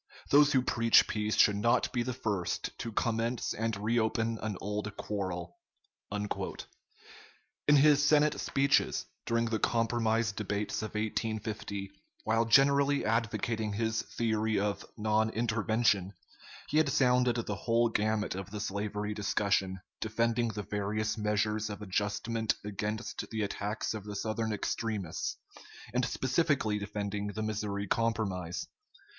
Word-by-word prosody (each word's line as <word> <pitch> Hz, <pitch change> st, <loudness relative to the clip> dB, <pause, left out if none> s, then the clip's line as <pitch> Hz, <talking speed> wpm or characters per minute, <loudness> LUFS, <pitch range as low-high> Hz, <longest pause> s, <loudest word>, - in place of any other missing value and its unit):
Those 145 Hz, +1 st, +7 dB
who 130 Hz, -2 st, +3 dB
preach 115 Hz, -2 st, +5 dB
peace 105 Hz, 0 st, -1 dB
should 105 Hz, -1 st, +5 dB
not 115 Hz, +5 st, +2 dB
be 120 Hz, -, +1 dB
the 125 Hz, +2 st, -2 dB
first 105 Hz, -8 st, -2 dB
to 115 Hz, -, -4 dB
commence 115 Hz, +2 st, -1 dB
and 115 Hz, -1 st, -2 dB
reopen 115 Hz, +1 st, 0 dB
an 105 Hz, -3 st, -3 dB
old 105 Hz, +1 st, -4 dB
quarrel." 90 Hz, -4 st, -4 dB, 0.5 s
In 105 Hz, +7 st, -4 dB
his 145 Hz, 0 st, +6 dB
Senate 150 Hz, 0 st, +4 dB
speeches, 140 Hz, +1 st, +2 dB, 0.2 s
during 115 Hz, 0 st, +2 dB
the 115 Hz, -1 st, -1 dB
compromise 115 Hz, -1 st, +1 dB
debates 105 Hz, 0 st, -2 dB
of 110 Hz, 0 st, -6 dB
1850, 110 Hz, -2 st, -3 dB, 0.3 s
while 115 Hz, +1 st, +2 dB
generally 140 Hz, +3 st, +4 dB
advocating 110 Hz, -1 st, 0 dB
his 115 Hz, +1 st, 0 dB
theory 110 Hz, -2 st, 0 dB
of 100 Hz, 0 st, -1 dB
"non 110 Hz, 0 st, +2 dB
intervention," 110 Hz, -3 st, +1 dB, 0.6 s
he 150 Hz, -, +1 dB
had 155 Hz, -2 st, +4 dB
sounded 125 Hz, -2 st, +3 dB
the 115 Hz, -, -2 dB
whole 115 Hz, 0 st, +2 dB
gamut 110 Hz, -1 st, 0 dB
of 95 Hz, +1 st, -6 dB
the 105 Hz, +1 st, -5 dB
slavery 105 Hz, +1 st, -2 dB
discussion, 100 Hz, -2 st, 0 dB, 0.2 s
defending 115 Hz, +2 st, +1 dB
the 105 Hz, -2 st, -4 dB
various 105 Hz, +2 st, -1 dB
measures 105 Hz, 0 st, 0 dB
of 105 Hz, -, -6 dB
adjustment 105 Hz, +3 st, -1 dB
against 105 Hz, +1 st, -4 dB
the 110 Hz, -1 st, -2 dB
attacks 105 Hz, +3 st, -2 dB
of 105 Hz, -2 st, -6 dB
the 105 Hz, -1 st, -6 dB
Southern 110 Hz, +2 st, -2 dB
extremists, 105 Hz, -3 st, -2 dB, 0.6 s
and 125 Hz, +1 st, +1 dB
specifically 130 Hz, -6 st, +1 dB
defending 105 Hz, 0 st, -3 dB
the 110 Hz, +1 st, -4 dB
Missouri 105 Hz, -2 st, -2 dB
Compromise. 100 Hz, -, -1 dB
110 Hz, 130 wpm, -31 LUFS, 105-115 Hz, 0.6 s, Those